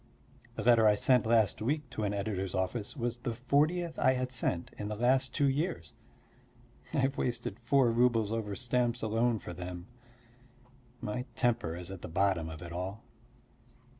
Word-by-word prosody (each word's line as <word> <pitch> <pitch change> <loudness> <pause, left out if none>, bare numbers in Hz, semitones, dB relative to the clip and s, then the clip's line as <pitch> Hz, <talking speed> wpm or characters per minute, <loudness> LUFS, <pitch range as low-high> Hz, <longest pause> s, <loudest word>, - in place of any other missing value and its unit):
The 110 - -4
letter 115 -2 +6
I 105 - +5
sent 125 +1 +3
last 110 -3 +3
week 145 +5 -1
to 110 - -3
an 100 - 0
editor's 100 -2 -2
office 100 +7 -2
was 120 -1 -2
the 120 -1 -3
fortieth 155 +7 +1
I 130 - +4
had 130 0 -2
sent 90 -8 -1
in 105 - -3
the 105 - -3
last 130 +4 +2
two 145 -2 +2
years. 135 - -2 1.0
I - - -2
have 135 +1 0
wasted 120 -3 -2
four 120 +1 +3
roubles 115 -2 +2
over 110 -3 -2
stamps 120 -1 0
alone 115 +2 +1
for 90 - -8
them. 90 0 -7 1.2
My 125 +4 -3
temper 115 -10 0
is 90 +1 -7
at 95 -3 -8
the - - -6
bottom 90 -2 +1
of 80 +1 -8
it 85 - -8
all. 95 +5 -5
115 Hz, 170 wpm, -31 LUFS, 95-125 Hz, 1.2 s, letter